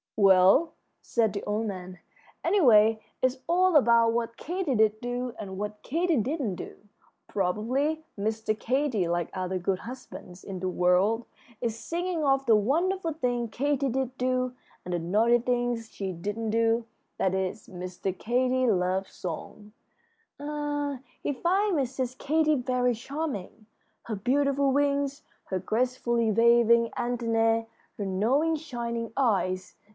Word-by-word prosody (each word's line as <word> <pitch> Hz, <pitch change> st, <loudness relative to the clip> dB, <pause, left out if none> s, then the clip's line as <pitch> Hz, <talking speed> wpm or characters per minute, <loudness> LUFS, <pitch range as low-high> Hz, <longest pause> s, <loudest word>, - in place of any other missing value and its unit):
"Well," 195 Hz, -, +5 dB, 0.3 s
said 225 Hz, -3 st, +1 dB
the 200 Hz, -, -4 dB
old 210 Hz, +2 st, -1 dB
man, 185 Hz, -2 st, -7 dB, 0.4 s
"anyway, 225 Hz, -, +5 dB, 0.2 s
it's 255 Hz, +1 st, +2 dB
all 365 Hz, +1 st, +3 dB
about 235 Hz, -4 st, +5 dB
what 230 Hz, 0 st, -2 dB
Katy 345 Hz, -5 st, -2 dB
did 215 Hz, -1 st, +3 dB
do 245 Hz, 0 st, -3 dB
and 190 Hz, -2 st, -6 dB
what 210 Hz, +1 st, -5 dB
Katy 335 Hz, +2 st, 0 dB
didn't 245 Hz, -, -1 dB
do. -, -, -8 dB, 0.5 s
Probably 250 Hz, -, -1 dB, 0.2 s
Mr. 215 Hz, +1 st, -1 dB
Katy, 255 Hz, -7 st, 0 dB
like 175 Hz, -1 st, -1 dB
other 185 Hz, 0 st, -2 dB
good 185 Hz, +1 st, -1 dB
husbands 210 Hz, -7 st, -10 dB
in 190 Hz, -2 st, -6 dB
the 185 Hz, +1 st, -2 dB
world, 185 Hz, +6 st, +2 dB, 0.3 s
is 230 Hz, -2 st, -2 dB
singing 340 Hz, +4 st, -2 dB
of 270 Hz, -1 st, +2 dB
the 225 Hz, -, +5 dB
wonderful 330 Hz, -, +1 dB
things 245 Hz, -5 st, -1 dB
Katy 275 Hz, +2 st, 0 dB
did 260 Hz, +1 st, -2 dB
do 255 Hz, 0 st, 0 dB, 0.3 s
and 180 Hz, -, -4 dB
the 175 Hz, -, 0 dB
naughty 215 Hz, +8 st, +3 dB
things 240 Hz, -2 st, -1 dB
she 195 Hz, -2 st, -4 dB
didn't 205 Hz, +6 st, -4 dB
do. 230 Hz, +1 st, +2 dB, 0.3 s
That 190 Hz, -, +1 dB
is 190 Hz, +2 st, -2 dB
Mr. 185 Hz, +1 st, -5 dB
Katy's 255 Hz, +4 st, +1 dB
love 185 Hz, 0 st, 0 dB
song. 190 Hz, +4 st, -7 dB, 0.7 s
Ah, 290 Hz, -1 st, -3 dB, 0.2 s
he 290 Hz, -, -1 dB
finds 370 Hz, +4 st, +1 dB
Mrs. 255 Hz, -1 st, -2 dB
Katy 310 Hz, +1 st, +2 dB
very 250 Hz, -1 st, +1 dB
charming 230 Hz, -, -5 dB, 0.4 s
her 220 Hz, -, -4 dB
beautiful 275 Hz, +5 st, +1 dB
wings, 280 Hz, 0 st, 0 dB, 0.2 s
her 190 Hz, -, -2 dB
gracefully 235 Hz, +2 st, 0 dB
waving 235 Hz, +1 st, +5 dB
antennæ, 230 Hz, -2 st, +1 dB, 0.3 s
her 205 Hz, -, -3 dB
knowing, 250 Hz, +12 st, +1 dB
shining 235 Hz, -6 st, -4 dB
eyes! 195 Hz, -8 st, 0 dB
235 Hz, 135 wpm, -27 LUFS, 205-275 Hz, 0.7 s, Well